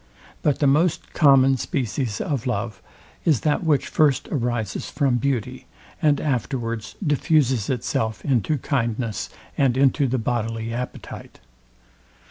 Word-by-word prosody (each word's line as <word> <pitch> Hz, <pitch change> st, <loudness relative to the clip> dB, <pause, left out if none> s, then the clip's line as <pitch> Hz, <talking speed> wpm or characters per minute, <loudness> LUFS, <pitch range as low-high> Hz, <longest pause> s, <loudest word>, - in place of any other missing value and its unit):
But 145 Hz, -, +2 dB
the 145 Hz, -, +1 dB
most 150 Hz, +5 st, +2 dB
common 135 Hz, -3 st, +5 dB
species 125 Hz, -, -2 dB
of 135 Hz, -5 st, -2 dB
love 105 Hz, -3 st, -3 dB, 0.4 s
is 155 Hz, -8 st, +2 dB
that 150 Hz, +3 st, +1 dB
which 155 Hz, -4 st, +2 dB
first 145 Hz, -4 st, +2 dB
arises 120 Hz, -, -2 dB
from 135 Hz, -4 st, +1 dB
beauty, 125 Hz, -2 st, -2 dB, 0.3 s
and 150 Hz, -2 st, +3 dB
afterwards 120 Hz, -4 st, -2 dB
diffuses 145 Hz, -, +2 dB
itself 115 Hz, -3 st, -2 dB
into 135 Hz, +2 st, +1 dB
kindness 115 Hz, -5 st, -2 dB, 0.3 s
and 130 Hz, -3 st, +3 dB
into 135 Hz, +1 st, +3 dB
the 130 Hz, +1 st, 0 dB
bodily 115 Hz, -1 st, -2 dB
appetite. 125 Hz, +1 st, -7 dB
130 Hz, 120 wpm, -23 LUFS, 115-145 Hz, 0.4 s, common